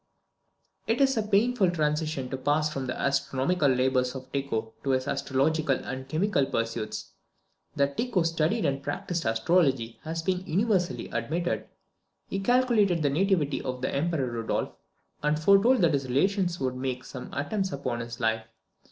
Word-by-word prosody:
It 225 +2 +1
is 270 -1 +4
a 220 - +2
painful 210 0 +2
transition 155 -4 -1
to 130 - -2
pass 150 +3 +1
from 135 -1 -3
the 130 - -4
astronomical 140 +4 +1
labours 130 0 +1
of 130 0 -8
Tycho 115 -5 -2
to 140 - -2
his 130 0 +1
astrological 140 +2 +1
and 130 0 -6
chemical 155 -3 +1
pursuits. 115 -1 -3 0.6
That 140 -1 +1
Tycho 230 -8 +1
studied 165 0 +1
and 140 -1 0
practised 165 +4 -3
astrology 120 0 +1
has 160 +1 -4
been 185 +1 0
universally 190 -1 +1
admitted. 170 +3 -2 0.6
He 195 - -3
calculated 215 -6 +3
the 145 - +2
nativity 160 -3 +1
of 125 0 -5
the - - -1
Emperor 150 -1 0
Rudolph, 115 -2 -2 0.5
and 150 +1 +1
foretold 200 +8 +5
that 165 -3 +4
his 135 -2 0
relations 175 +6 +1
would 130 -1 -1
make 130 -1 -3
some 125 - -8
attempts 190 +7 -2
upon 130 -4 -3
his 115 0 -6
life. 110 -1 0
145 Hz, 155 wpm, -27 LUFS, 130-180 Hz, 0.6 s, foretold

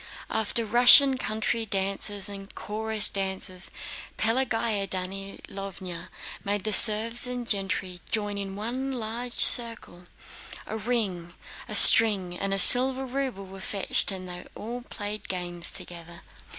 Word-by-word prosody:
After 220 +1 -2
Russian 250 +4 +5
country 220 -1 -3
dances 200 0 -4
and 195 -1 -9
chorus 215 0 0
dances, 190 -2 -4 0.5
Pelagéya 225 -3 -1
Danílovna 195 -1 -8 0.4
made 205 -1 -3
the 215 - -3
serfs 230 +4 +5
and 245 -1 -7
gentry 195 -3 -3
join 205 -2 -3
in 195 -1 -7
one 250 +6 -5
large 235 +1 -6
circle: 230 -7 +4 0.6
a - - -7
ring, 200 -6 -4 0.3
a - - -4
string, 195 -6 +7
and 195 +2 -5
a 195 - 0
silver 260 +6 +5
ruble 255 -6 -6
were 190 0 -13
fetched 195 +1 -2
and 185 -1 -6
they 180 0 -8
all 240 +3 -8
played 210 -3 -8
games 175 -2 -5
together. 170 0 -9
205 Hz, 125 wpm, -25 LUFS, 190-230 Hz, 0.6 s, string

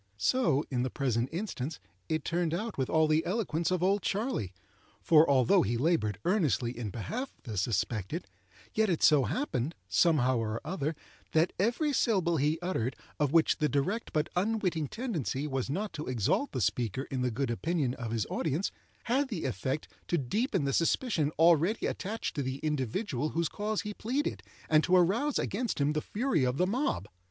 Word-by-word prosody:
So, 155 - +2
in 125 -2 0
the 130 - 0
present 125 -3 0
instance, 165 -5 -4 0.3
it 160 -2 -1
turned 170 -1 0
out 220 +4 -3
with 130 -2 -1
all 160 -1 +4
the 155 +1 +3
eloquence 170 -5 -1
of 185 -1 0
"Old 195 +2 +3
Charley"; 205 - -1 0.5
for, 160 -1 +5
although 130 -4 +5
he 115 +4 0
laboured 125 - +1
earnestly 150 - +1
in 115 -3 -4
behalf 230 - -4
of - - -34
the 115 -5 -6
suspected, 100 -1 -1 0.5
yet 220 -1 +2
it 170 - 0
so 145 -4 +6
happened, 165 - -2
somehow 135 -7 +3
or 110 0 -2
other, 155 -2 -2 0.4
that 160 +3 +3
every 245 - +1
syllable 185 -10 +2
he 150 +3 +2
uttered 130 -9 -1 0.2
of 145 -2 +2
which 165 0 +4
the 150 -1 +2
direct 145 - -1
but 155 0 +1
unwitting 185 -5 0
tendency 165 - -3
was 135 -3 -2
not 195 +7 -2
to 155 -2 -5
exalt 130 - 0
the 130 - -2
speaker 110 +4 0
in 130 -2 -1
the 125 - +1
good 125 +2 -1
opinion 145 0 0
of 120 -3 -5
his 110 -2 -1
audience, 160 +5 -1 0.3
had 265 +4 +1
the 205 -10 -4
effect 130 +5 -2 0.2
to 175 - +1
deepen 190 - 0
the 140 - 0
suspicion 165 - +1
already 170 +6 +4
attached 210 +3 -3
to 145 - -1
the 130 0 -3
individual 150 - -1
whose 165 +1 0
cause 210 +4 -2
he 210 - -5
pleaded, 260 +9 -2 0.3
and 155 0 +4
to 185 - +3
arouse 210 - +3
against 230 -1 -2
him 145 +1 +2
the 155 - 0
fury 225 - 0
of 125 +1 0
the 180 - +3
mob. 200 - -1
155 Hz, 180 wpm, -30 LUFS, 130-195 Hz, 0.5 s, so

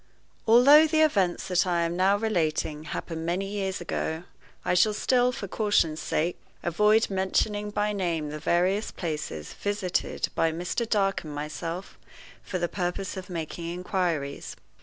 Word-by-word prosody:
ALTHOUGH 280 +7 +8
the 315 0 +2
events 195 - +2
that 180 0 +2
I 170 -1 +2
am 170 +1 -1
now 190 +3 +3
relating 160 -7 -1
happened 165 0 -5
many 175 +4 -1
years 195 -1 -3
ago, 165 -1 -3 0.4
I - - +2
shall 205 +4 +4
still, 250 +2 +3
for 210 -5 -6
caution's 180 -7 +1
sake, 170 +3 -1 0.2
avoid 210 +6 +3
mentioning 205 +2 0
by 210 0 0
name 170 -6 -1
the 150 - -5
various 185 +7 +1
places 150 - -5
visited 205 -3 -2
by 165 - +2
Mr. 180 +8 -2
Dark 195 -2 +1
and 150 -2 -7
myself 165 +5 -5 0.4
for 185 - -4
the 175 -1 0
purpose 180 +2 -3
of 190 -1 -7
making 165 -1 -5
inquiries. 175 -5 -2
180 Hz, 150 wpm, -27 LUFS, 165-205 Hz, 0.4 s, ALTHOUGH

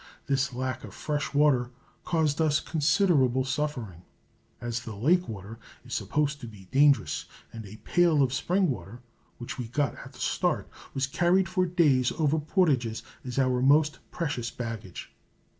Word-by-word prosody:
This 140 0 +1
lack 130 0 -3
of - - -10
fresh 145 -1 -2
water 140 -4 +3 0.4
caused 160 -3 +1
us 155 -2 +3
considerable 145 -5 +2
suffering, 130 - -3 0.6
as 120 -1 -3
the 110 -3 -8
lake 170 - +2
water 110 +1 -8 0.3
is - - -8
supposed 150 -1 -1
to 120 - -7
be 100 -4 -13
dangerous, 140 -3 +3 0.3
and 110 -2 -8
a 100 - -10
pail 155 +6 +3
of 130 -1 0
spring 180 +3 +1
water, 120 0 -8 0.3
which 120 +2 -7
we 120 - -3
got 140 +3 0
at - - -12
the - - -15
start, - - 0 0.3
was 135 0 +1
carried 175 +6 +2
for 185 0 +1
days 150 -8 +3
over 155 -1 +1
portages 145 - +1 0.2
as 125 -1 -6
our 130 -2 +2
most 150 +3 +4
precious 145 -8 -3
baggage. 115 -6 -7
135 Hz, 160 wpm, -28 LUFS, 120-155 Hz, 0.6 s, most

